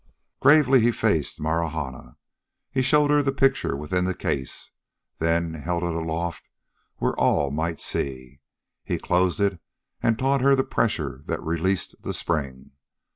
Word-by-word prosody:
Gravely 140 -3 +6
he 115 - +4
faced 105 -10 0
Marahna. 80 -4 -3 0.5
He 135 - +1
showed 145 +3 +3
her 145 0 +5
the 135 -1 +1
picture 135 - +1
within 90 +5 -1
the 95 0 -1
case, 65 -4 -3 0.5
then 85 0 +1
held 85 +3 -3
it 85 -1 -1
aloft 85 +1 -3 0.5
where - - 0
all 70 -1 +2
might 80 +3 -2
see. 65 0 -4 0.4
He - - -2
closed 90 +1 +1
it 100 -3 +1 0.4
and 115 -2 +2
taught 135 +1 +1
her 140 +1 +5
the 135 - +2
pressure 65 - -1
that - - -3
released 85 +3 -1
the - - -3
spring. 70 -6 -3
85 Hz, 145 wpm, -25 LUFS, 80-125 Hz, 0.5 s, Gravely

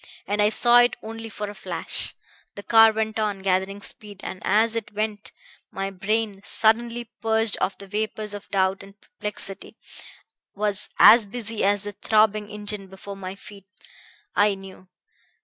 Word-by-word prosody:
And 205 +2 0
I 210 - +4
saw 240 +2 +5
it 245 0 +4
only 225 +1 -7
for 210 -1 -5
a 205 - -7
flash. 190 - -1 0.4
The 200 - -8
car 225 0 +6
went 220 0 -2
on, 205 -3 -2
gathering 190 +1 0
speed, 205 -1 -9
and 185 - -6
as 220 +3 +2
it 225 -2 -4
went, 215 0 -3 0.4
my 195 0 -4
brain, 205 +1 -2
suddenly 235 +2 +1
purged 225 -1 +3
of 195 - -1
the 200 - -10
vapors 215 +1 -3
of 205 0 -9
doubt 190 0 +1
and 195 +1 -15
perplexity, 210 -2 -6 0.8
was 205 -1 0
as 225 -2 +8
busy 225 0 -4
as 200 +1 +2
the 205 - -4
throbbing 215 0 +1
engine 210 -1 -4
before 190 +1 -10
my 190 -1 -7
feet. 200 -1 -14 0.7
I 205 -1 +3
knew. 190 -1 -13
210 Hz, 160 wpm, -24 LUFS, 195-220 Hz, 0.8 s, as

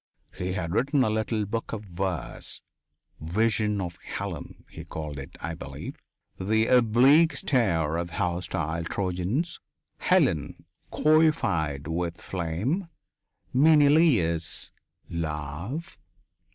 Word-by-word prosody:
He 90 0 -3
had 85 -3 -3
written 135 +4 +2
a 110 - +1
little 110 0 0
book 115 +3 -4
of 110 -1 -4
verse, 90 - -3 0.6
"Vision 105 +5 +1
of 85 -3 -4
Helen," - - -6
he - - -9
called 75 -2 -6
it, 70 - -9
I 85 - -4
believe.... - - -7 0.4
The 110 +4 +2
oblique 125 +7 +5
stare 85 - +1
of 85 0 -2
the 85 - -14
hostile 85 -3 -1
Trojans. 95 - -2 0.4
Helen - - +1 0.3
coifed 100 - +2
with 85 +1 -2
flame. 95 - -2 0.7
Menelaus. 145 - +4 0.4
Love 85 - -4
95 Hz, 105 wpm, -27 LUFS, 85-125 Hz, 0.7 s, oblique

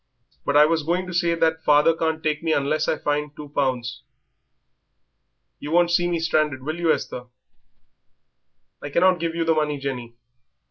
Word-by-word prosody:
But 140 - +1
I 150 - +8
was 160 +1 +1
going 175 +4 -1
to 180 - -7
say 170 -1 +1
that 160 -1 0
father 150 +2 +4
can't 160 -1 -2
take 150 -1 -1
me 165 -1 0
unless 150 +2 0
I - - 0
finds 150 0 -2
two 150 -1 -9
pounds. 130 -4 -2 1.6
You 145 - -7
won't 175 +1 +3
see 175 +1 +2
me 170 - 0
stranded, 155 -5 0
will 155 +4 -4
you, 170 -2 +2
Esther?" 125 - -3 1.6
"I 145 - -6
cannot 180 +4 +3
give 165 0 -2
you 165 -1 -1
the 165 - +3
money, 150 -2 0
Jenny. 125 -4 -5
155 Hz, 175 wpm, -23 LUFS, 145-165 Hz, 1.6 s, I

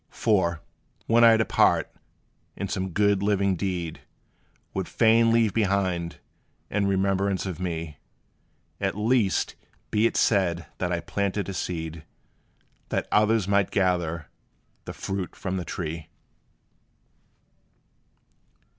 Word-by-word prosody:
For, 90 -7 +1 0.4
when 115 +1 +4
I 115 -1 +8
depart, 110 - +2 0.6
and - - -4
some 95 0 -2
good, 100 +1 +2
living 100 -2 +2
deed 90 -2 -3 0.7
Would 95 -2 -2
fain 115 0 +4
leave 115 -3 +3
behind, 95 -5 0 0.5
in 100 -1 +1
remembrance 95 0 +1
of 90 -5 -5
me, 80 -4 -4 0.8
At - - -1
least, 110 -2 +1 0.4
be 110 +2 +3
it - - -3
said 90 -6 +2
that 90 -1 -1
I 85 -1 -1
planted 100 +3 -2
a - - -4
seed, 80 -3 -4 0.9
That - - -1
others 105 -1 +3
might 100 -1 +2
gather 85 -4 0 0.6
the - - -6
fruit 95 -2 -4
from 95 -1 -3
the 90 - -4
tree! 80 -2 -5
95 Hz, 115 wpm, -26 LUFS, 85-105 Hz, 0.9 s, I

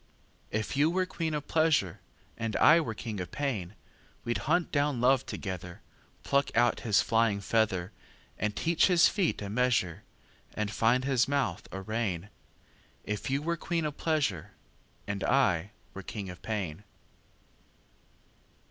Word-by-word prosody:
If 110 +5 -2
you 145 +3 +4
were 185 +2 +1
queen 165 -3 -3
of 145 -1 -4
pleasure, 155 - +2 0.4
And 115 -2 -3
I 160 +2 +7
were 115 -8 -4
king 105 -2 -5
of 90 -1 -4
pain, 110 -8 -3 0.5
We'd 120 - -1
hunt 175 +1 +2
down 145 -3 +1
love 130 +1 +3
together, 90 -3 -6 0.4
Pluck 140 0 +2
out 120 0 +3
his 110 -3 +3
flying 115 -3 +2
feather, 100 -3 0 0.5
And 105 0 -1
teach 165 0 +3
his 175 -3 +6
feet 185 - 0
a - - -4
measure, 110 -7 +1 0.5
And 105 -1 -2
find 120 +4 +2
his 130 -2 +2
mouth 140 -1 -1
a 95 - -5
rein; 105 -3 -2 0.7
If 105 +3 -4
you 140 +2 0
were 170 +1 -1
queen 165 -1 -2
of 150 -1 -3
pleasure. 105 - -1 0.5
And 100 -1 -3
I 100 -9 +2 0.2
were 95 - -7
king 95 0 -6
of 90 - -12
pain. 100 -5 -4
115 Hz, 150 wpm, -29 LUFS, 100-145 Hz, 0.7 s, I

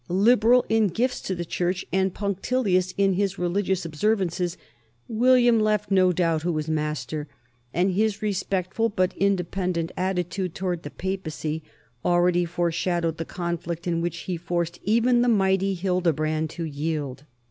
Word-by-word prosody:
Liberal 230 +6 +4
in 225 -1 +3
gifts 240 +8 -1
to 190 - -3
the 175 0 -4
church 180 +2 -1
and 190 0 +2
punctilious 200 -1 0
in 195 -1 +3
his 195 +1 0
religious 185 +1 0
observances, 180 0 0 0.5
William 240 0 +4
left 210 -1 +1
no 185 -1 +5
doubt 165 -2 +1
who 175 +2 0
was 155 -1 -2
master, 150 -1 -2 0.4
and 180 +6 +1
his 210 +2 +1
respectful 200 +1 -1
but 185 -3 0
independent 180 -3 0
attitude 180 -1 -2
toward 180 -3 -2
the 145 - -7
Papacy 160 -4 -4 0.4
already 175 0 +3
foreshadowed 170 -1 -1
the 165 - -4
conflict 170 -1 -4
in 170 -2 0
which 170 -1 -3
he 180 -2 -3
forced 175 0 -2
even 235 +4 +3
the 245 - +3
mighty 195 -2 +2
Hildebrand 160 -4 0
to 165 +2 -6
yield. 150 -3 -3
180 Hz, 145 wpm, -25 LUFS, 170-200 Hz, 0.5 s, no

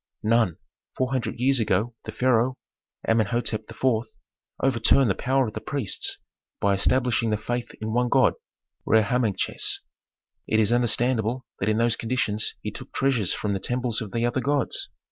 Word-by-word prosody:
"None. 110 -5 +2 0.4
Four 130 0 0
hundred 130 -3 -2
years 135 +1 +3
ago 110 +2 +1
the 110 - -5
pharaoh, 125 +1 +2 0.5
Amenhôtep 115 0 0
IV. 115 -1 0 0.5
overturned 130 -1 +3
the - - +2
power 130 +6 +1
of 105 - -6
priests 135 -8 -1 0.4
by 100 0 +2
establishing 120 +3 +2
the 105 - +1
faith 120 +3 -3
in 110 0 -3
one 125 +1 +2
god, 130 -2 +4 0.5
Re 110 -1 +4
Harmachis. 110 -3 0 0.7
It 110 - +2
is 110 +1 +3
understandable 120 0 +1
that 95 - 0
in 110 - +2
those 115 0 +2
conditions 110 -3 -1
he - - -3
took - - -10
treasures 125 -8 +1
from 105 -1 -2
the 95 - -1
temples 125 0 -2
of 105 -3 -6
the 115 0 0
other 120 +2 0
gods. 140 +3 0
115 Hz, 160 wpm, -25 LUFS, 110-125 Hz, 0.7 s, god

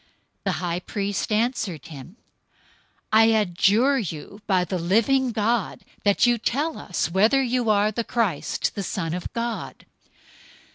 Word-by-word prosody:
The 195 - +1
high 175 +1 -2
priest 200 +2 -3
answered 215 - -1
him, 160 - -11 1.0
"I 220 +1 +7
adjure 220 +5 +3
you 195 +1 -6
by 185 -3 +2
the 185 0 -3
living 230 +9 +2
God, 220 0 -1 0.2
that 205 +3 +3
you 240 -1 +2
tell 290 +8 -1
us 175 -3 -2
whether 220 +9 +3
you 245 -2 0
are 210 0 +3
the 235 +2 -2
Christ, 220 -10 -1
the 200 - -4
Son 170 -3 -3
of 180 0 -5
God." 235 0 -4
210 Hz, 140 wpm, -24 LUFS, 180-235 Hz, 1.0 s, I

